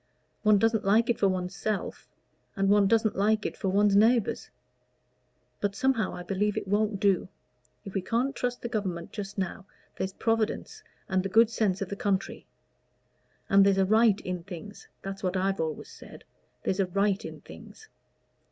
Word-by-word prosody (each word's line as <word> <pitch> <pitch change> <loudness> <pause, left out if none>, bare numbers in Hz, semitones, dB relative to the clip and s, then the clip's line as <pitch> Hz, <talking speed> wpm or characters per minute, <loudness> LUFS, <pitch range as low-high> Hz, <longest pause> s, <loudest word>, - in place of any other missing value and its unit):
One 215 -1 +5
doesn't 225 +1 +2
like 225 +5 +3
it 235 - -3
for 200 - +4
one's 185 0 -3
self, 215 +1 -3 0.5
and 195 0 +1
one 205 -1 +5
doesn't 220 0 +2
like 215 +2 +1
it - - -3
for 195 - -2
one's 200 +1 +3
neighbors. 225 +2 +3 1.1
But 200 -1 -1
somehow, 260 -3 0
I 180 - -7
believe 200 +3 -1
it - - -3
won't 205 0 0
do: 195 -2 +2 0.6
if 195 - -8
we 195 - -1
can't 240 +8 -1
trust 245 0 -3
the - - -1
Government 190 -7 -3
just 200 -2 -7
now, 190 0 -4 0.3
there's 190 0 -3
Providence 225 0 -1 0.3
and 190 -1 +1
the 195 - -4
good 225 +3 +5
sense 200 -4 0
of 190 - -8
the 200 - -4
country; 200 -1 -2 1.0
and 195 -1 +6
there's 195 -1 +3
a 190 - +3
right 215 0 +4
in 180 -1 -4
things 190 +3 -10 0.2
that's 195 0 -6
what 185 0 -1
I've 195 +1 0
always 160 -2 -4
said - - -13 0.4
there's 190 - -1
a 190 - +2
right 200 +2 0
in - - -8
things. 435 - -13
200 Hz, 180 wpm, -28 LUFS, 190-220 Hz, 1.1 s, and